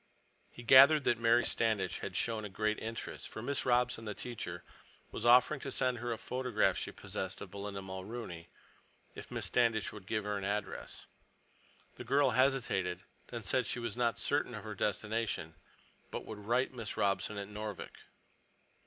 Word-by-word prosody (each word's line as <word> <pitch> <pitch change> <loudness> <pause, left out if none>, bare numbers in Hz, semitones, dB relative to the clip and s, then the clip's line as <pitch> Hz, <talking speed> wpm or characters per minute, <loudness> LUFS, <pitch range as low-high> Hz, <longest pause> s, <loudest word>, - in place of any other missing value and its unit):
He 120 - -11
gathered 140 +5 +8
that 120 -3 +2
Mary 115 +1 +4
Standish 110 -4 0
had - - -5
shown 115 -2 0
a 105 - -5
great 110 +2 0
interest, 115 +1 -5
for 110 - -7
Miss 140 +1 -1
Robson, 125 -2 +2
the 105 -1 -4
teacher, 90 -9 -6 0.5
was 120 - -2
offering 125 +5 +6
to - - -5
send 125 -2 +1
her 120 +1 -3
a 115 - -1
photograph 125 +2 +1
she - - -3
possessed 95 0 -5
of 95 - -8
Belinda 100 0 -5
Mulrooney; 95 -2 -7 0.6
if - - -9
Miss - - -3
Standish 115 -3 +2
would 100 -3 -11
give 110 -1 -1
her 105 0 -2
an - - -7
address. 100 0 -3 0.9
The - - -6
girl 140 +4 +3
hesitated, 115 -8 +1 0.3
then 120 -2 -6
said 125 +6 +1
she - - -2
was 120 -4 -3
not 120 -1 +1
certain - - 0
of - - -7
her - - -5
destination, 105 -7 -1 0.6
but - - -5
would 110 - -7
write 125 +3 +2
Miss 115 -4 -5
Robson 100 +1 +1
at 100 -1 -4
Noorvik. 105 -1 -6
110 Hz, 170 wpm, -33 LUFS, 100-120 Hz, 0.9 s, gathered